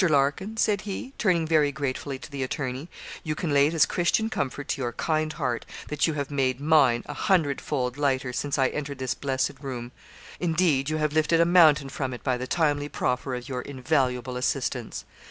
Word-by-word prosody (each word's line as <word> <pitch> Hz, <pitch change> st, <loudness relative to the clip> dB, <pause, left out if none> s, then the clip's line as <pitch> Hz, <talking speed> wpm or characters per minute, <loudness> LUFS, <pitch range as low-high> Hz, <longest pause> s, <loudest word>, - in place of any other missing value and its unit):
Larkin,' 155 Hz, +7 st, +1 dB
said 210 Hz, -2 st, +2 dB
he, 210 Hz, +6 st, -6 dB
turning 175 Hz, -6 st, +2 dB
very 155 Hz, -3 st, +3 dB
gratefully 140 Hz, -1 st, -3 dB
to 140 Hz, -, -11 dB
the 140 Hz, -1 st, -4 dB
attorney 130 Hz, +3 st, -3 dB, 0.3 s
'you 155 Hz, -2 st, -2 dB
can 155 Hz, -1 st, -2 dB
lay 140 Hz, +1 st, +5 dB
this 165 Hz, -1 st, +4 dB
Christian 220 Hz, +6 st, +1 dB
comfort 140 Hz, -, -3 dB
to -, -, -1 dB
your 120 Hz, -2 st, -2 dB
kind 155 Hz, +4 st, 0 dB
heart, 125 Hz, -7 st, -2 dB, 0.3 s
that 150 Hz, +2 st, +1 dB
you 160 Hz, -, 0 dB
have 145 Hz, -1 st, -3 dB
made 130 Hz, -2 st, 0 dB
mine 140 Hz, -6 st, +4 dB
a 145 Hz, -, -6 dB
hundredfold 140 Hz, -6 st, 0 dB
lighter 130 Hz, -3 st, 0 dB
since 145 Hz, +3 st, -1 dB
I 135 Hz, -2 st, +3 dB
entered 140 Hz, -2 st, -4 dB
this 130 Hz, -1 st, -1 dB
blessed 135 Hz, -1 st, -2 dB
room; 125 Hz, -3 st, -5 dB, 0.5 s
indeed, 160 Hz, -5 st, +2 dB
you 155 Hz, -, 0 dB
have 150 Hz, -1 st, 0 dB
lifted 155 Hz, +1 st, +3 dB
a 170 Hz, -, +6 dB
mountain 155 Hz, -5 st, +5 dB
from 130 Hz, -2 st, -3 dB
it -, -, -12 dB
by 130 Hz, -2 st, +1 dB
the 125 Hz, +1 st, -4 dB
timely 145 Hz, -3 st, +1 dB
proffer 125 Hz, -1 st, -1 dB
of 125 Hz, +1 st, -7 dB
your 130 Hz, -3 st, -3 dB
invaluable 130 Hz, -2 st, -1 dB
assistance.' 125 Hz, -2 st, -2 dB
140 Hz, 190 wpm, -26 LUFS, 130-155 Hz, 0.5 s, a